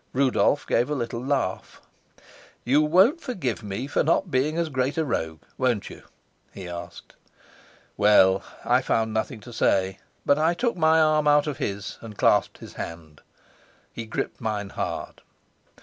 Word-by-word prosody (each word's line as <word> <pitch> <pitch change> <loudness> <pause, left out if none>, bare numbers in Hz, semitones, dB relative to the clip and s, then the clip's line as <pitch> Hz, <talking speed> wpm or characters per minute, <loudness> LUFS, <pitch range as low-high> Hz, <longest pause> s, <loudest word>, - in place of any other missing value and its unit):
Rudolf 140 +2 +2
gave 120 +4 +1
a 150 - -1
little 120 -2 -4
laugh. 130 -9 -2 0.8
"You 140 +5 +3
won't 190 - +4
forgive 180 - -3
me 105 +4 -4
for 145 - 0
not 170 +3 +1
being 150 +5 +1
as 170 -1 0
great 130 +1 -1
a 160 - +1
rogue, 80 - -3 0.2
won't 125 -6 0
you?" - - -12 0.5
he 95 -2 -9
asked. 85 0 -9 0.8
Well, 100 -2 +5 0.2
I - - +3
found 110 -1 0
nothing 110 0 -3
to 120 +2 -11
say, 95 -3 +1 0.3
but 140 - +3
I 165 +2 +2
took 240 +5 0
my 160 -1 +4
arm 155 -1 +3
out 145 0 +5
of 150 -5 -4
his 100 0 -4
and 110 -3 -10
clasped - - +2
his - - -12
hand. 80 -3 -8 0.7
He 115 -1 -7
gripped - - -4
mine 105 -3 -3
hard. - - -5
125 Hz, 160 wpm, -25 LUFS, 100-150 Hz, 0.8 s, Well